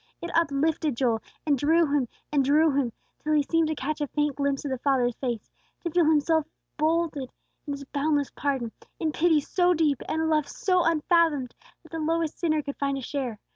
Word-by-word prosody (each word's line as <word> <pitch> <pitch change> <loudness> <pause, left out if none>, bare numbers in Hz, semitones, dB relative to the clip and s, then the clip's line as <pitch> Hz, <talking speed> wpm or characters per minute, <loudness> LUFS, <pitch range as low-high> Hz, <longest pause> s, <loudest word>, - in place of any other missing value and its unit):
It 340 - -5
uplifted 305 -3 +1
Joel, 235 -4 +1 0.2
and 295 -2 +3
drew 325 +4 +4
him, 285 -4 +1 0.2
and 285 -2 +3
drew 300 +4 +4
him, 270 -4 0 0.3
till 310 - -1
he 295 -1 +4
seemed 330 +2 +1
to 310 - -1
catch 305 +3 -3
a 295 - 0
faint 295 0 0
glimpse 280 0 -1
of 280 - -2
the 260 - -2
Father's 255 -3 +2
face; 240 -5 -3 0.3
to 340 - -3
feel 345 0 +3
himself 315 0 +3 0.3
folded 310 -4 0 0.4
in 285 - -2 0.2
boundless 290 -1 +1
pardon, 265 -5 -2 0.3
in 315 - 0
pity 320 0 +3
so 355 +4 +2
deep, 300 -4 +1
and 320 - 0
a 320 - +1
love 305 -2 +2
so 365 -2 +1
unfathomed, 320 -5 +2 0.3
that - - -18
the 325 - -4
lowest 325 0 -1
sinner 310 -3 +1
could 280 - -6
find 275 -1 -1
a - - -4
share. 255 -4 -3
295 Hz, 200 wpm, -26 LUFS, 275-320 Hz, 0.4 s, drew